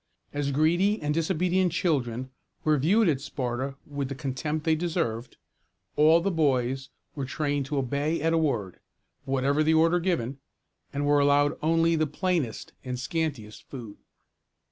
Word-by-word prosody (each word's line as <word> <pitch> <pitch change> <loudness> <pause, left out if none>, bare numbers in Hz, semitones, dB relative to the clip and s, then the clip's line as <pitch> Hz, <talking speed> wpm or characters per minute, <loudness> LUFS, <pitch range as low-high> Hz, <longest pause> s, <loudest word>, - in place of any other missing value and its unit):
As 145 -1 -1
greedy 175 +9 +2
and 150 0 -1
disobedient 180 +2 +1
children 130 -8 -1 0.3
were 155 -2 +3
viewed 200 - +3
at 140 -5 +1
Sparta 135 -1 -3
with 140 -2 -4
the 140 - -4
contempt 145 +4 -3
they 160 - +4
deserved, 155 -8 -2 0.6
all 160 +3 +5
the 195 +3 0
boys 135 -5 0 0.2
were 140 - -4
trained 145 0 -1
to 145 0 -2
obey 140 +5 0
at 165 +2 +1
a - - +3
word, 115 - -1 0.5
whatever 135 +2 +1
the 160 +1 +3
order 165 +2 +4
given, 140 -8 -1 0.5
and 145 0 -2
were 145 0 +4
allowed 145 +1 +3
only 165 +1 +3
the 155 -1 +1
plainest 160 - -2
and 125 -1 -4
scantiest 135 -6 -3
food. 115 -7 -8
145 Hz, 150 wpm, -27 LUFS, 135-165 Hz, 0.6 s, all